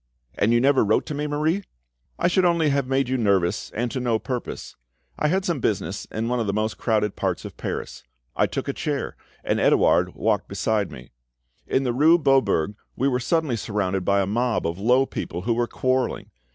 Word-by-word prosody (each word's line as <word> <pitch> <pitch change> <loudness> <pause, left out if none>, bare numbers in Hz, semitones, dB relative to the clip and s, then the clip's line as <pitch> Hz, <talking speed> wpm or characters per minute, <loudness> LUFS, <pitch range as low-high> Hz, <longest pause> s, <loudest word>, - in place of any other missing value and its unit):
"And 110 - +1
you 120 - +4
never 135 +2 +4
wrote 110 +1 +2
to - - -5
me, 150 +1 -2
Marie?" 155 +6 0 0.5
"I 175 - +2
should 185 +1 +2
only 170 -3 +3
have 140 -2 0
made 135 0 +1
you 130 0 -1
anxious, 100 -3 +1
and 120 +1 -3
to 130 - -2
no 120 -3 +1
purpose. 125 +2 -5 0.4
I - - +2
had 185 +4 +1
some 170 -5 0
business 100 -4 -2
in 110 +1 -4
one 125 0 0
of 115 - -1
the 100 - 0
most 110 +1 -2
crowded 105 -3 0
parts - - -2
of - - -8
Paris; - - -5 0.3
I - - +2
took - - -4
a - - -1
chair, - - -3 0.3
and - - 0
Edouard - - +3
walked - - 0
beside 105 -3 -1
me. 65 0 -11 0.6
In 135 - +1
the 125 -2 0
rue 155 +7 +5
Beaubourg 135 - +2 0.2
we 135 - +1
were 125 -2 +1
suddenly 155 0 0
surrounded 100 -3 -2
by 100 +2 +2
a - - +1
mob 115 +3 0
of 85 +2 -2
low 125 +6 +4
people, 90 -8 -5
who 115 +3 +1
were 120 +1 0
quarrelling. 130 +1 -1
120 Hz, 205 wpm, -24 LUFS, 105-140 Hz, 0.6 s, rue